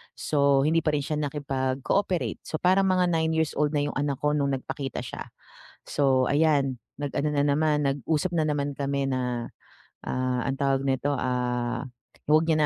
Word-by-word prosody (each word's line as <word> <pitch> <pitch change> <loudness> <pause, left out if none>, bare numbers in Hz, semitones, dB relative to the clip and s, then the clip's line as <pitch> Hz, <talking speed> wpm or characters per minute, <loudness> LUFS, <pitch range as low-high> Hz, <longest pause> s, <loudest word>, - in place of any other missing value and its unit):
so 140 -2 +2
hindi 160 +2 +3
pa 155 - +2
rin 145 - -1
siya 150 +1 -2
nakipag-cooperate 140 +5 -1
so - - -5
parang 190 +2 +3
mga 185 -1 +3
9 160 -1 +1
years 160 -1 +1
old 150 0 +1
na 145 - +2
yung 145 - -3
anak 145 -1 0
ko 150 - +3
nung 140 -1 +1
nagpakita 135 0 -5
siya. - - -7 0.6
So 135 -3 +2
ayan, 140 -4 +2 0.2
nag-ano 145 +1 -1
na 140 - +3
naman, 150 0 +2
nag-usap 150 +5 0
na 160 - +2
naman 145 -1 -1
kami 140 0 0
na, 125 -2 -2 0.5
ah, 130 -1 -1
ang 135 - -1
tawag 135 -1 +1
nito, 135 +1 0
ah, 125 -1 -1 0.4
wag 155 +2 +5
niya 155 -1 +3
140 Hz, 170 wpm, -26 LUFS, 135-155 Hz, 0.6 s, wag